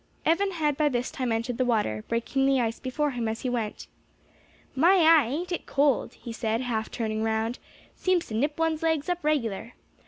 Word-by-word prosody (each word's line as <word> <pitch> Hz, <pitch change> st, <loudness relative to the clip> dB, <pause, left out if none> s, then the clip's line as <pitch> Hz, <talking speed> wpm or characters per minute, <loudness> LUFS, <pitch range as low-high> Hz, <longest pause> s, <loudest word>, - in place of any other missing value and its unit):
Evan 390 Hz, +4 st, +2 dB
had 300 Hz, -4 st, 0 dB
by 300 Hz, -1 st, +3 dB
this 250 Hz, -2 st, -2 dB
time 255 Hz, -3 st, -2 dB
entered 230 Hz, +2 st, -2 dB
the -, -, +4 dB
water, 210 Hz, -, 0 dB
breaking 270 Hz, +4 st, 0 dB
the 270 Hz, -1 st, +3 dB
ice 230 Hz, -2 st, -1 dB
before 285 Hz, +3 st, -1 dB
him 240 Hz, -3 st, -2 dB
as 220 Hz, +1 st, -3 dB
he 255 Hz, -, -2 dB
went. 225 Hz, -4 st, -3 dB, 0.9 s
"My 340 Hz, +8 st, +5 dB
eye, 325 Hz, -7 st, +6 dB
ain't 330 Hz, +8 st, -3 dB
it 350 Hz, -, -3 dB
cold!" 280 Hz, -1 st, +1 dB
he 235 Hz, -, -8 dB
said, 225 Hz, 0 st, -1 dB
half 225 Hz, -3 st, -2 dB
turning 220 Hz, -2 st, -2 dB
round, 225 Hz, +2 st, -1 dB, 0.4 s
"seems 370 Hz, -2 st, +1 dB
to -, -, -9 dB
nip 290 Hz, +7 st, 0 dB
one's 325 Hz, -1 st, 0 dB
legs 320 Hz, -1 st, 0 dB
up 355 Hz, 0 st, -2 dB
regular. 235 Hz, -7 st, -1 dB
255 Hz, 195 wpm, -27 LUFS, 225-310 Hz, 0.9 s, eye